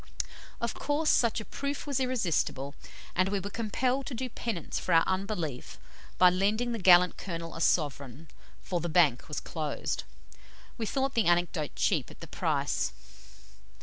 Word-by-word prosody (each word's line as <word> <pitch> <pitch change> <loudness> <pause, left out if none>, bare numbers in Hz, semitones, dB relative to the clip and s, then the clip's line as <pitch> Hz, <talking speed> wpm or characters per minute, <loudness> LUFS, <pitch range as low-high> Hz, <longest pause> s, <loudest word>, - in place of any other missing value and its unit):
Of 235 - -1
course, 300 +2 +1
such 235 -2 +3
a 215 - -7
proof 280 0 -4
was 280 -3 -1
irresistible, 170 - 0 0.4
and 185 +1 +3
we 200 0 0
were 200 +2 -6
compelled 250 +5 -1
to 260 - -4
do 255 +2 -3
penance 220 -7 -3
for 180 - -1
our 165 - +6
unbelief 185 - -3 0.4
by 180 -1 +7
lending 210 +6 +1
the 230 - -2
gallant 180 -1 +6
Colonel 165 -3 -5
a 165 - -6
sovereign, 145 -3 0 0.4
for 180 -2 -1
"the 170 - -3
Bank 155 -7 +3
was 150 - -3
closed." 155 -3 -3 0.7
We 225 -3 -3
thought 270 +2 0
the 230 - +2
anecdote 175 -3 +1
cheap - - +1
at - - -14
the - - -8
price. - - -1
185 Hz, 160 wpm, -29 LUFS, 165-235 Hz, 0.7 s, by